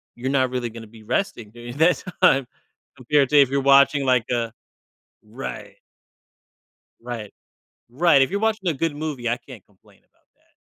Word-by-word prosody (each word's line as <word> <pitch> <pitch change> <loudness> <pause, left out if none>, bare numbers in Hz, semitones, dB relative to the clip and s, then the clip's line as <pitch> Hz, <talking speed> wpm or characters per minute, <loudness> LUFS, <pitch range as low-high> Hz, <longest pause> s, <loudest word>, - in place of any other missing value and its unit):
you're 125 +2 -4
not 130 -2 +2
really 125 -1 -3
gonna 115 0 -10
be 110 0 -16
resting 120 - -3
during 120 +2 -10
that 165 +3 +3 0.2
time, 135 -7 +4 0.5
compared 140 +3 +2
to 150 - 0
if 135 - +3
you're 140 - 0
watching, 140 +1 +4
like, 125 -2 +3
a 115 -2 -2 0.7
Right. 65 -1 -8 1.2
Right. 115 -4 -7 0.6
Right, 150 -1 +4
if 135 - +1
you're 200 +1 -2
watching 220 -3 0
a - - +2
good 150 +1 -2
movie, 145 -6 -4
I 120 - 0
can't 125 -5 -14
complain 100 -2 -26
about - - -40
that. - - -38
130 Hz, 170 wpm, -22 LUFS, 120-150 Hz, 1.2 s, time